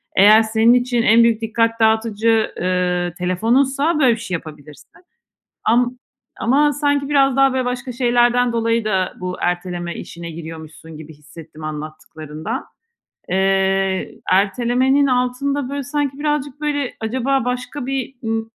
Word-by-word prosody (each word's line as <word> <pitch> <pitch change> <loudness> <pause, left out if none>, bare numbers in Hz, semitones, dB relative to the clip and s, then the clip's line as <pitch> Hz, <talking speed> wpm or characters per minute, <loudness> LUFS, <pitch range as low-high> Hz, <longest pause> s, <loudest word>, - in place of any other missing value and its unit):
Eğer 210 +3 +7
senin 220 +2 +3
için 245 -1 +1
en 230 +1 +5
büyük 230 -1 +2
dikkat 230 +1 0
dağıtıcı, 220 0 +2
eee, 180 -1 -1
telefonunsa 265 - +1
böyle 260 -5 +5
bir - - -10
şey 225 -6 -4
yapabilirsin. 150 -2 -11 0.7
Am 245 +2 +1 0.4
ama 290 +5 +3
sanki 285 -1 0
biraz 275 -2 +3
daha 270 -1 +4
böyle 260 -1 -1
başka 250 +1 -4
şeylerden 245 0 +2
dolayı 230 -1 0
da 190 -3 -1
bu 180 0 -4
erteleme 175 -1 -3
işine 170 0 -8
giriyormuşsun 160 -1 -10
gibi 155 0 -11
hissettim 155 +1 -13
anlattıklarından. 155 - -6 0.6
Eee, 190 0 0
ertelemenin 245 +8 +2
altında 255 +2 -1
böyle 280 0 -3
sanki 285 0 -3
birazcık 295 -1 -2
böyle 290 -3 -2
acaba 260 +4 -1
başka 250 +2 -4
bir 270 -1 -3
i 225 -1 -2
230 Hz, 130 wpm, -19 LUFS, 185-260 Hz, 0.7 s, Eğer